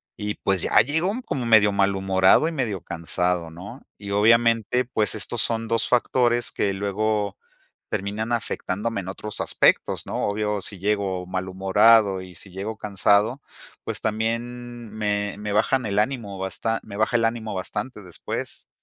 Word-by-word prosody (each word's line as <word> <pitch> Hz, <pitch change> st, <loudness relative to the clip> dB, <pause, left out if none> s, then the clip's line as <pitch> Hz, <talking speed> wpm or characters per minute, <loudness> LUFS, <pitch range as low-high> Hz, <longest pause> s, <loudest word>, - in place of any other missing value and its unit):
Y 105 Hz, 0 st, -4 dB
pues, 95 Hz, -3 st, 0 dB
ya -, -, +4 dB
llego 160 Hz, +8 st, +1 dB
como 130 Hz, -3 st, -2 dB
medio 110 Hz, -2 st, +6 dB
malhumorado 95 Hz, +5 st, +3 dB
y -, -, -2 dB
medio 115 Hz, -, -2 dB
cansado, 85 Hz, 0 st, -1 dB
¿no? 100 Hz, +10 st, -10 dB, 0.2 s
Y 100 Hz, -1 st, -8 dB
obviamente, 115 Hz, +3 st, +3 dB
pues, 110 Hz, -4 st, +1 dB
estos 110 Hz, +1 st, 0 dB
son 115 Hz, -1 st, 0 dB
2 115 Hz, -1 st, +1 dB
factores 120 Hz, -1 st, +2 dB
que 100 Hz, -, 0 dB
luego 100 Hz, +1 st, -1 dB, 0.5 s
terminan 105 Hz, +4 st, -3 dB
afectándome 110 Hz, -1 st, -2 dB
en 90 Hz, -, -10 dB
otros 105 Hz, +2 st, -5 dB
aspectos, -, -, +2 dB
¿no? -, -, -3 dB
Obvio, 105 Hz, 0 st, -1 dB
si 100 Hz, -, -3 dB
llego 100 Hz, -2 st, -1 dB
malhumorado 95 Hz, +2 st, +3 dB
y 90 Hz, -1 st, -11 dB
si 95 Hz, +3 st, -9 dB
llego 100 Hz, +4 st, -5 dB
cansado, 105 Hz, +5 st, +1 dB, 0.4 s
pues, -, -, -3 dB
también 115 Hz, +1 st, -3 dB
me 105 Hz, -1 st, -2 dB
me 105 Hz, 0 st, -4 dB
bajan 110 Hz, +5 st, +1 dB
el 100 Hz, -, -2 dB
ánimo 110 Hz, -5 st, -2 dB
basta 110 Hz, +4 st, -2 dB
me 100 Hz, -, -10 dB
baja 110 Hz, +2 st, +2 dB
el 115 Hz, -, +1 dB
ánimo 115 Hz, -3 st, -2 dB
bastante 105 Hz, +5 st, -5 dB
después. 90 Hz, -2 st, -6 dB
105 Hz, 155 wpm, -23 LUFS, 100-115 Hz, 0.5 s, medio